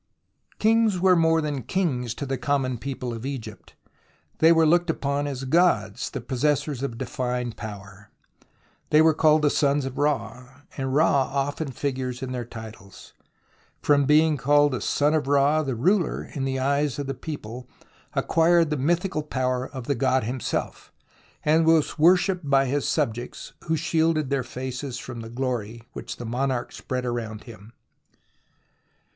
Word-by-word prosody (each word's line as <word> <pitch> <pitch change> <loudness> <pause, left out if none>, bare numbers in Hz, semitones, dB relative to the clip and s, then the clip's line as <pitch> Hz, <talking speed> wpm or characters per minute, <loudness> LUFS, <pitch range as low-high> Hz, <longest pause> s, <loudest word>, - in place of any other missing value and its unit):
Kings 220 -3 +3
were 185 0 +5
more 165 -1 +3
than 145 -3 -3
kings 125 - -1
to 140 - -5
the 135 0 -2
common 130 -2 0
people 125 -2 -4
of 115 0 -7
Egypt. 130 -5 -7 0.6
They 160 +1 +6
were 165 -1 +5
looked 175 +2 +3
upon 145 -2 -1
as 135 -2 -4
gods, 130 - +1
the - - -5
possessors 140 +2 -1
of 135 -4 -4
divine 125 -1 -3
power. 100 -2 -10 0.8
They 150 - +5
were 160 0 +5
called 155 0 +3
the 145 - +4
sons 140 -1 +1
of 135 -1 -5
Ra, 130 -2 -2
and 135 -1 -2
Ra 140 -3 +3
often 145 +3 -2
figures 130 -1 -3
in 130 - -4
their 125 -2 -4
titles. 110 -4 -11 0.7
From 145 -1 +4
being 150 +1 +4
called 145 +2 +3
the 130 - -3
son 150 +1 +1
of 150 -3 0
Ra, 145 +2 +3
the 135 -5 -2
ruler 180 - +1
in 135 -2 -2
the 135 0 -1
eyes 140 +1 0
of 145 - -3
the 135 - -3
people 125 -3 -7 0.5
acquired 165 -1 +3
the 150 - 0
mythical 170 +4 0
power 130 -3 -2
of 130 -3 -8
the 140 - +1
god 130 0 +1
himself, 125 +3 -4 0.5
and 155 +2 +4
was 160 -2 +2
wor 175 +4 +7
shipped 180 -5 -2
by 135 -1 +4
his 140 +2 -1
subjects, 120 +2 -3
who 160 -1 +1
shielded 160 -2 +1
their 140 -1 +1
faces 130 +1 -5
from 125 -2 -7
the 115 - -8
glory 120 -2 -3
which - - -6
the 120 - -7
monarch 125 +1 -2
spread 125 -1 -4
around 115 -3 -4
him. 110 -2 -13
135 Hz, 165 wpm, -25 LUFS, 125-155 Hz, 0.8 s, wor